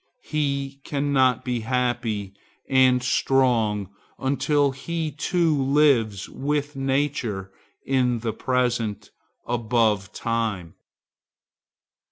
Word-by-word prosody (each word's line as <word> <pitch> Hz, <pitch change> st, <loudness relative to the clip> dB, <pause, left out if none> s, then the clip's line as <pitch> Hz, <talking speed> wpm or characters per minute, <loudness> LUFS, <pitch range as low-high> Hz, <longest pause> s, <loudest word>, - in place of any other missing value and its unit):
He 140 Hz, -2 st, -2 dB
cannot 140 Hz, -4 st, +1 dB
be 125 Hz, -2 st, -1 dB
happy 115 Hz, -4 st, -1 dB, 0.3 s
and 130 Hz, -2 st, +4 dB
strong 115 Hz, -7 st, +1 dB, 0.3 s
until 140 Hz, +1 st, +1 dB
he 160 Hz, +3 st, -4 dB
too 160 Hz, +2 st, +1 dB
lives 135 Hz, -8 st, +2 dB
with 145 Hz, +1 st, -2 dB
nature 135 Hz, -8 st, -1 dB, 0.3 s
in 125 Hz, -3 st, +1 dB
the 110 Hz, -1 st, -2 dB
present, 120 Hz, -3 st, -1 dB, 0.3 s
above 110 Hz, -4 st, +1 dB
time. 110 Hz, -9 st, -2 dB
125 Hz, 85 wpm, -24 LUFS, 115-140 Hz, 0.3 s, and